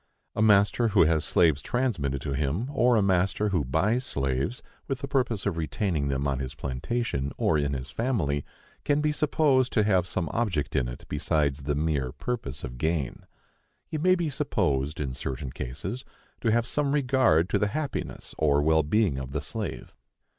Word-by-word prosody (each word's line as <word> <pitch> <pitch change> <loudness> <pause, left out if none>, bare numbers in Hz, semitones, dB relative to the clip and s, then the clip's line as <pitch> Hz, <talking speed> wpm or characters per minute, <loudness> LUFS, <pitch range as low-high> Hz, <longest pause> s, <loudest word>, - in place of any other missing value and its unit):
A - - 0
master 105 +2 +4
who 100 -5 +5
has 80 -1 +2
slaves 80 -4 +3
transmitted 90 - -1
to 70 - -2
him, 75 - -1
or 125 -2 +4
a 105 - +3
master 95 +2 +2
who 90 -7 +1
buys 95 - +1
slaves 70 - -2 0.2
with 135 - -1
the 140 - -3
purpose 125 -7 0
of 95 -5 -1
retaining 80 -1 -1
them 70 0 -1
on 70 -2 -1
his 65 0 -5
plantation 70 - -2
or 80 - +2
in 70 -1 0
his 65 +1 -5
family, 85 - 0 0.4
can 145 0 +2
be 150 0 +1
supposed 145 -4 +2
to 105 - +3
have 95 -4 +2
some 90 -2 -2
object 90 -13 -1
in 65 -4 +1
it - - -8
besides 75 -1 0
the 75 +1 -1
mere 75 -4 0
purpose 75 - -4
of 60 -2 -7
gain. 80 -3 -2 0.6
He 155 - -4
may 185 +4 +4
be 170 -4 -1
supposed, 75 - 0
in 70 -4 -2
certain 65 +1 -5
cases, 70 - -5 0.4
to 115 - +1
have 120 +1 +2
some 140 +2 0
regard 130 - +3
to - - +1
the 105 - +2
happiness 150 +6 -4
or 75 -2 +3
well 80 +1 +4
being 80 -2 +1
of 65 0 -7
the 75 - -1
slave. 105 +8 -5
85 Hz, 185 wpm, -27 LUFS, -, 0.6 s, who